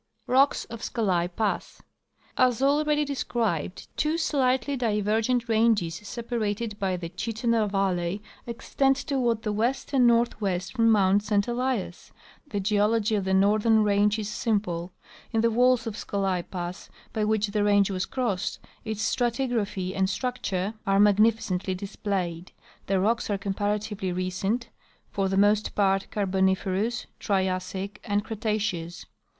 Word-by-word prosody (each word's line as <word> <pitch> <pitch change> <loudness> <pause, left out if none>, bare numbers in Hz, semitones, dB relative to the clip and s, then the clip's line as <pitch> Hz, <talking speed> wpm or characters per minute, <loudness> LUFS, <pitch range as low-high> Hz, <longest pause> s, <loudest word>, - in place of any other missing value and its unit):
Rocks 270 +3 +3
of 230 -1 -9
Scolai 185 -8 0
Pass. 205 +4 -2 0.3
— - - -51 0.2
As 250 -2 +3
already 295 +1 +2
described, 225 - -2
two 310 +2 0
slightly 270 -3 +1
diver 215 -3 +1
gent 245 +1 0
ranges, 220 -6 +2
separated 225 -2 -3
by 190 -3 0
the 170 -1 -5
Chittenah 220 +3 0
valley, 190 -1 0 0.3
extend 270 +3 +1
toward 250 -6 -1
the 210 - -1
west 235 +7 -1
and 255 -3 +5
northwest 200 -6 +1
from 230 -1 +3
mount 200 -2 +4
St 205 0 +1
Elias. 240 -7 -2 0.4
The 205 -8 -3
geology 210 +2 +2
of 200 -3 0
the 190 0 +2
northern 215 +3 +4
range 205 +1 +3
is 215 -2 -3
simple. 200 -5 -1 0.4
In 225 -2 +1
the 230 0 +3
walls 250 +1 +3
of 225 -3 -4
Scolai 195 -5 -2
pass, 175 -1 -6 0.2
by 220 -2 0
which 215 -1 +1
the 205 0 0
range 205 -1 +3
was 185 -1 -2
crossed, 235 -8 -2 0.3
its 220 -1 -3
stratigraphy 230 -6 -1
and 190 0 +1
structure 200 -3 -2
are 195 0 +3
magnificently 205 -3 +3
displayed. 185 -3 -4 0.4
The 195 -1 +2
rocks 225 +5 +1
are 205 - +1
comparatively 205 0 -2
recent, 185 +6 -2 0.4
for 195 -1 0
the 190 - 0
most 205 +1 +3
part 195 -1 +2
Carboniferous, 190 +3 0
Triassic, 190 0 -2
and 205 -2 0
Cretaceous. 210 -6 -3
210 Hz, 140 wpm, -26 LUFS, 190-230 Hz, 0.4 s, and